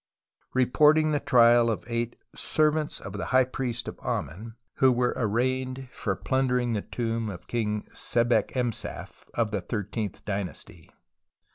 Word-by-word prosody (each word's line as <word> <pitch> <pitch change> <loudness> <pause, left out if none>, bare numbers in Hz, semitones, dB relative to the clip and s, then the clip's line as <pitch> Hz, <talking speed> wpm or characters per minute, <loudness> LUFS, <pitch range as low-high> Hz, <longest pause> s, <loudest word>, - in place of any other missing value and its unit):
reporting 150 +5 +4
the 145 - +2
trial 120 -2 +5
of 110 - -2
eight 115 0 -2 0.2
"servants 155 0 +1
of 95 - -8
the 105 - -4
High 130 0 +4
Priest 125 -2 -3
of - - -7
Amen," 110 +7 -4 0.2
who 130 -1 +5
were 125 0 +1
arraigned 130 +3 -1
for 100 -6 -2
plundering 125 -1 0
the 105 - -1
tomb 115 -1 -2
of 90 -4 -8
King 105 -3 -1
Sebekemsaf 120 0 -1
of 115 -3 +1
the 100 -3 -1
thirteenth 105 +1 -4
dynasty. 95 -4 -5
120 Hz, 135 wpm, -27 LUFS, 110-130 Hz, 0.2 s, trial